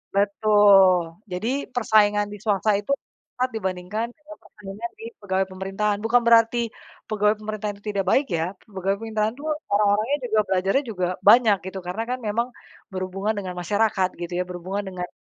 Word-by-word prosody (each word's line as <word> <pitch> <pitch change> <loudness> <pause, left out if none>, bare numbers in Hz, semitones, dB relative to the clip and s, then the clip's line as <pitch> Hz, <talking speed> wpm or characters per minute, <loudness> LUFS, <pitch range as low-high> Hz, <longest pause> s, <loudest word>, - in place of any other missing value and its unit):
Betul. 200 -2 +5 0.3
Jadi, 180 +5 -3 0.3
persaingan 210 -3 +3
di - - -7
swasta 210 0 +2
itu, 205 +6 -5 0.5
ngat 255 +1 +1
dibandingkan 190 +2 -3
dengan 310 0 -13
persaingan 210 +2 -8
di - - -10 0.2
pegawai 190 -1 0
pemerintahan. 195 +2 -1
Bukan 240 +2 +4
berarti, 230 0 +5 0.5
pegawai 210 0 +2
pemerintahan 215 -1 -4
itu 200 - -24
tidak 195 -2 -1
baik, 280 - +3
ya. 160 - 0 0.3
Pegawai 195 +1 0
pemerintahan 220 0 -1
itu 285 - -12 0.3
orang-orangnya 210 +5 +2
juga 220 -2 +1
belajarnya 195 +9 +1
juga 185 -4 -1 0.2
banyak, 225 -2 +7
gitu. 190 0 -5
Karena, 195 +6 -2
kan, 255 +1 -2
memang, 230 +3 0 0.4
berhubungan 190 +3 -2
dengan 185 -3 -4
masyarakat, 205 0 +1
gitu, 175 0 -5
ya. 180 - +1
Berhubungan 185 +3 -4
dengan, 180 -1 -5
205 Hz, 160 wpm, -24 LUFS, 190-220 Hz, 0.5 s, banyak